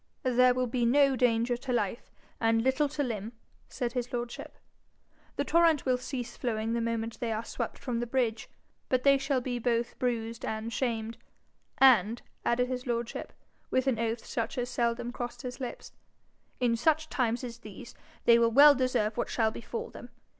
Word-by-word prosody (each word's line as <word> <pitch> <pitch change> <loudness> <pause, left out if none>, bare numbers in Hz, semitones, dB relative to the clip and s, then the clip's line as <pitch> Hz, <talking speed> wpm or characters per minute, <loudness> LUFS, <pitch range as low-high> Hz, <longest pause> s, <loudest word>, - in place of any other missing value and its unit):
'There 250 -1 +4
will 255 0 +1
be 245 0 -1
no 275 +3 +4
danger 240 0 +2
to 250 +2 -5
life, 230 -2 -1 0.3
and 225 0 +2
little 265 +3 +2
to 290 0 -2
limb,' 225 -3 -4 0.4
said 240 -2 -3
his 245 -1 -3
lordship. 240 -1 -5 0.8
'The - - -1
torrent 330 -4 +3
will 255 -1 +3
cease 250 -1 -5
flowing 225 -2 -2
the 235 - 0
moment 230 -1 -3
they 235 -3 -2
are 220 +1 -3
swept - - -4
from 245 -3 -3
the 240 - -2
bridge. 230 -3 -1 0.4
But 255 -1 +1
they 275 -1 +5
shall 275 -1 0
be 245 -1 -3
both 235 0 -1
bruised 230 -2 -2
and 220 +1 -3
shamed; 230 -2 -2 0.6
and,' 235 -4 +5 0.2
added 250 +1 +1
his 255 0 -4
lordship, 235 -1 -3 0.4
with 260 0 +1
an 255 -5 +1
oath 230 0 -2
such 230 +3 -3
as 245 0 -2
seldom 235 0 -1
crossed 245 +1 -6
his 250 +1 -6
lips, 255 -2 -6 0.7
'in 240 -2 +2
such 315 +6 +2
times 240 -4 -1
as 240 -1 -7
these, 215 +1 -11 0.3
they 235 0 +7
will 230 0 +4
well 285 +5 +8
deserve 250 -5 0
what - - -1
shall 220 -2 +1
befall 230 +1 -6
them. 245 - -11
240 Hz, 180 wpm, -29 LUFS, 230-255 Hz, 0.8 s, well